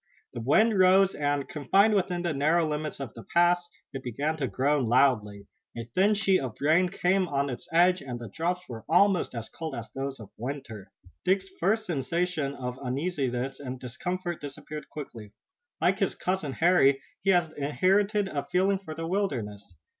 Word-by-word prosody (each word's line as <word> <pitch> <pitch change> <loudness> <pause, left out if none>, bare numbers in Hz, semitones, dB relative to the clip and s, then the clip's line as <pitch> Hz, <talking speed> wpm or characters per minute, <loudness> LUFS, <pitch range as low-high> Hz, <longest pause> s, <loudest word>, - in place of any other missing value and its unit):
The 120 - -5
wind 210 - +3
rose, 190 +1 +5
and, 145 -1 -1
confined 195 +9 +3
within 180 -3 0
the 170 -2 0
narrow 155 +4 +2
limits 150 0 -3
of 135 -5 -6
the 115 - -10
pass, 175 0 +3 0.2
it 135 - -5
began 140 +5 -2
to 140 -4 -1
groan 140 -1 +1
loudly. 110 -5 +2 0.3
A 115 - -4
thin 205 +3 +4
sheet 195 -2 +3
of 130 -5 -5
rain 160 +6 +3
came 185 0 +1
on 140 -2 -1
its 120 - -7
edge, 180 +2 +4
and 125 -3 -6
the 120 - -7
drops 175 - -3
were 115 -3 -8
almost 180 -3 +3
as 115 -1 -5
cold 160 -4 -6
as 115 -1 -7
those 135 0 -4
of 105 -3 -11
winter. 120 -5 -6 0.3
Dick's 190 +1 +1
first 215 +5 +1
sensation 165 -2 -1
of 125 -1 -5
uneasiness 135 -2 -2
and 130 -2 -6
discomfort 175 +8 -4
disappeared 150 +2 -8
quickly. 115 -8 -9 0.5
Like 190 +3 +2
his 195 - 0
cousin, 180 -7 -2
Harry, 150 -5 +4 0.2
he 195 - 0
had 175 -4 +3
inherited 195 +8 +1
a 145 -6 -4
feeling 190 +2 +2
for 160 -5 -8
the 165 +1 -4
wilderness. 110 - -3
155 Hz, 175 wpm, -28 LUFS, 130-185 Hz, 0.5 s, rose